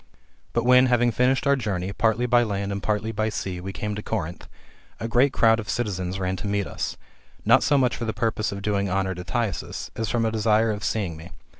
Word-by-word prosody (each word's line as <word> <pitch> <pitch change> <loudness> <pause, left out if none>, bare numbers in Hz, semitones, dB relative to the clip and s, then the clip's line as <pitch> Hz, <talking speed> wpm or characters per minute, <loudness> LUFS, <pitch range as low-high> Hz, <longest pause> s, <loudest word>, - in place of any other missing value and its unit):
But 120 - +1
when, 125 +1 +6
having 120 -1 +3
finished 125 +4 +2
our 140 0 +4
journey, 100 -6 -3
partly 110 +3 +1
by 120 0 +4
land 100 -3 -2
and 100 0 -3
partly 105 +3 -1
by 110 0 -1
sea, 95 -4 -4
we 95 +2 -5
came 105 +2 -4
to 105 - -4
Corinth, 90 -6 -4 0.5
a 115 - -3
great 125 +4 +3
crowd 115 -2 +4
of 105 - -6
the - - -1
citizens 95 -5 -2
ran 95 0 -1
to 105 - -5
meet 100 0 0
us, - - -4 0.5
not - - +6
so 145 - +3
much 125 -2 +2
for 120 - -4
the 110 - -1
purpose 110 0 -1
of 100 0 -6
doing 100 -1 0
honour 95 0 0
to 90 0 -7
Thyasus, 110 0 -3
as 115 -1 -2
from 115 -1 +1
a 110 - +1
desire 110 0 +2
of 105 -1 -5
seeing 95 -7 -1
me. 80 +2 -11
105 Hz, 235 wpm, -24 LUFS, 100-115 Hz, 0.5 s, when